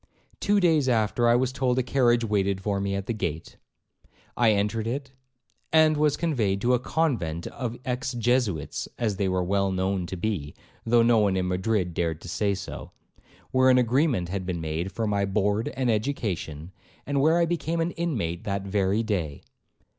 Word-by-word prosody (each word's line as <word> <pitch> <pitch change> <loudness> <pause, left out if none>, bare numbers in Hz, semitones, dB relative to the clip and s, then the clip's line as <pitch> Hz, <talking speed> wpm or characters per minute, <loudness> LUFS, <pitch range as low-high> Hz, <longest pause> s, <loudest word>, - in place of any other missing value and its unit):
Two 205 0 +2
days 160 -7 +3
after 115 0 +2
I 120 - +5
was 130 +1 +1
told 130 -2 0
a 130 - +2
carriage 120 -2 +2
waited 100 -3 0
for 100 0 -1
me 100 0 -1
at 100 -1 -3
the 115 - -2
gate. 85 -6 -4 0.8
I 120 -2 +4
entered 105 +2 0
it, 135 +2 -4 0.6
and 155 -1 +5
was 150 -1 +2
conveyed 115 - 0
to 125 +3 +2
a 125 - +3
convent 115 - -1
of 120 -2 -5
Ex 130 +1 -2
Jesuits, 120 - 0
(as 110 -5 -1
they 100 -1 0
were 95 -1 0
well 100 +1 +1
known 95 -1 -1
to 95 - -5
be, 85 -7 -3 0.3
though 115 0 +5
no 115 -1 +4
one 100 -3 +2
in 90 -1 0
Madrid 90 -1 0
dared 80 -2 -1
to - - -10
say 100 +4 0
so), 95 - -7 0.6
where 130 0 +4
an 130 - +6
agreement 125 - +2
had 95 0 -3
been 90 -2 -3
made 80 +4 -3
for 115 - -2
my 100 -1 0
board 100 +2 0
and 130 -3 +1
education, 100 - -3 0.3
and 140 -1 0
where 160 +4 +4
I 170 - +3
became 170 0 -2
an 165 +1 0
inmate 115 - -2
that 100 -1 -2
very 100 +2 0
day. 90 -10 -3
110 Hz, 185 wpm, -26 LUFS, 95-130 Hz, 0.8 s, an